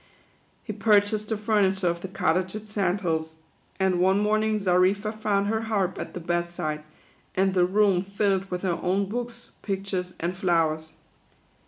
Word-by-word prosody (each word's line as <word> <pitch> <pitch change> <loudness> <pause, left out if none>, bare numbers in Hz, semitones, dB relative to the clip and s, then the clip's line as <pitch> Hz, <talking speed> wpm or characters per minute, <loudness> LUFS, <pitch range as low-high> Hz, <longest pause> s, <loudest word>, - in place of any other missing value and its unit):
He 215 - -5
purchased 210 0 +2
the 220 - 0
furniture 200 -3 +2
of 170 0 -1
the 190 - -5
Cottage 185 0 0
at 215 0 -7
Sand 200 -2 0
Hills, 160 -2 -2 0.4
and 190 -2 +2
one 190 +2 +4
morning 215 +1 +2
Xarifa 195 +2 +2
found 210 -2 0
her 220 +2 0
harp 195 -4 0
at - - -6
the - - -3
bed 175 0 -1
side, 155 -3 -4 0.5
and 190 0 +2
the 180 -1 +4
room 195 -1 +3
filled 195 0 0
with 180 0 -4
her 175 -3 0
own 195 +3 +1
books, 240 +2 -5
pictures, 190 -2 -3
and 175 +2 -2
flowers. 165 -4 +1
190 Hz, 165 wpm, -26 LUFS, 180-210 Hz, 0.5 s, one